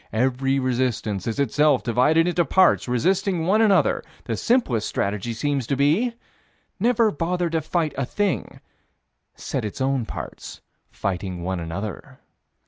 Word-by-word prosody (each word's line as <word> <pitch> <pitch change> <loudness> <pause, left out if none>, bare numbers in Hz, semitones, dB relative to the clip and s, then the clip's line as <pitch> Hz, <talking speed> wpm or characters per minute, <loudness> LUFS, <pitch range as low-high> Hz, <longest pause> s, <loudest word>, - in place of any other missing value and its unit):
Every 130 +3 +1
resistance 125 -6 -1
is 115 - -2
itself 140 +1 +2
divided 150 +8 +3
into 175 0 +2
parts 185 -2 +3
resisting 180 - +1
one 210 +5 +3
another. 205 -3 +3 0.2
The - - -3
simplest 140 - +1
strategy 105 +3 -2
seems 135 +1 -2
to 140 - 0
be 160 - +2 0.7
never 230 0 +3
bother 170 +2 -1
to 165 -1 0
fight 160 0 -1
a 135 - -1
thing: 205 +2 -2 0.7
set - - -4
its 105 +3 -5
own 130 -3 0
parts - - -8 0.3
fighting 90 -2 -4
one 95 0 -2
another. 95 +5 -6
135 Hz, 135 wpm, -23 LUFS, 115-175 Hz, 0.7 s, divided